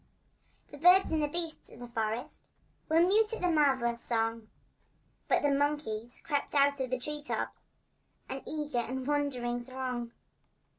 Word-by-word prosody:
The 290 - -10
birds 360 +4 +6
and 315 -1 +1
the 295 - +1
beasts 330 +1 -2
of - - -14
the 245 - -7
forest 225 0 -3 0.4
Were 320 +1 +5
mute 425 +5 +4
at 455 - -4
the 360 - +3
marvellous 265 -6 +2
song, 225 -1 -1 0.8
But - - +2
the 290 - +3
monkeys 275 -5 -1
crept 290 -2 -1
out 280 0 +4
of 260 -1 -2
the 255 - 0
tree 295 +4 -3
tops— 295 - -4 0.6
An 270 - -5
eager 300 -4 -1
and 255 +2 -3
wondering 255 -4 -1
throng. 250 -2 -4
275 Hz, 155 wpm, -31 LUFS, 240-300 Hz, 0.8 s, birds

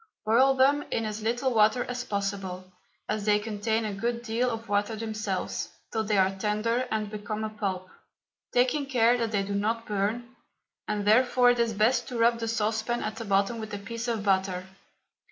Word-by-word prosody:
Boil 260 +5 +4
them 275 +2 +4
in 225 - -1
as 215 0 -4
little 245 +4 0
water 220 +3 +4
as 245 0 -4
possible, 195 -4 -4 0.3
as 210 -1 -2
they 210 -1 +4
contain 220 +1 -1
a 210 - -3
good 235 +4 -2
deal 240 +2 0
of 225 -1 -5
water 205 +2 0
themselves, 215 -3 -3 0.2
till 220 - 0
they 210 -1 +1
are 190 0 +3
tender 215 +5 0
and 215 -1 -2
become 215 0 -4
a 215 - -3
pulp, 190 -3 -3 0.6
taking 255 +3 +2
care 240 -3 +4
that 230 -1 0
they 205 -2 0
do 200 +1 -4
not 225 +3 -1
burn, 220 +5 -2 0.5
and 210 -1 -2
therefore 245 +3 +5
it 245 - -1
is 230 -1 +1
best 215 +5 +2
to 245 - -5
rub 230 0 +3
the 225 - -3
saucepan 220 +1 -1
at 215 +1 -4
the 230 - -5
bottom 200 +3 +1
with 220 -1 -6
a - - -3
piece 230 +4 -6
of 225 -3 -1
butter. 190 -2 +1
220 Hz, 190 wpm, -27 LUFS, 205-235 Hz, 0.6 s, therefore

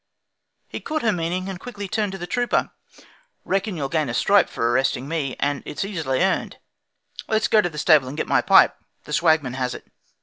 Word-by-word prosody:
He - - -6
caught 310 -3 -3
her 225 - +3
meaning, 180 +1 -2
and 190 -2 -6
quickly 205 -3 -7
turned 210 +1 -1
To - - -5
the 175 - -6
trooper: 245 +7 0 0.7
'Reckon 195 0 -1
you'll 140 -3 -2
gain 155 -2 -1
a 120 - -3
stripe 200 +6 +3
By - - -2
arresting 125 +2 +1
me, 145 -5 -2
and 145 -1 -1
it's 170 - -4
easily 160 -7 -1
earned; 190 - -1 0.7
Let's 220 0 +1
go 215 - +4
to 175 - -1
the 150 - -11
stable 150 -4 +4
and 140 +4 -7
get - - -1
my - - +3
pipe, - - +5 0.3
The - - -8
Swagman 145 -6 +2
has 125 -1 -2
it.' - - -11
170 Hz, 205 wpm, -22 LUFS, 140-195 Hz, 0.7 s, pipe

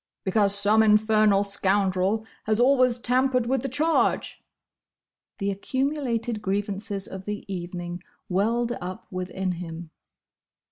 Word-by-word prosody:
"Because 200 +1 +2
some 205 +2 +4
infernal 215 -1 +4
scoundrel 200 +1 +1 0.2
has 215 +1 +1
always 255 -1 +4
tampered 250 0 +1
with 260 +1 0
the 270 - -3
charge!" 310 +5 0 0.9
The 200 -1 -1
accumulated 240 0 -2
grievances 200 0 -3
of 190 0 -8
the 210 0 -5
evening 175 -1 -5 0.3
welled 230 +6 0
up 185 +1 -6
within 185 0 -3
him. 170 -1 -7
205 Hz, 110 wpm, -25 LUFS, 190-235 Hz, 0.9 s, some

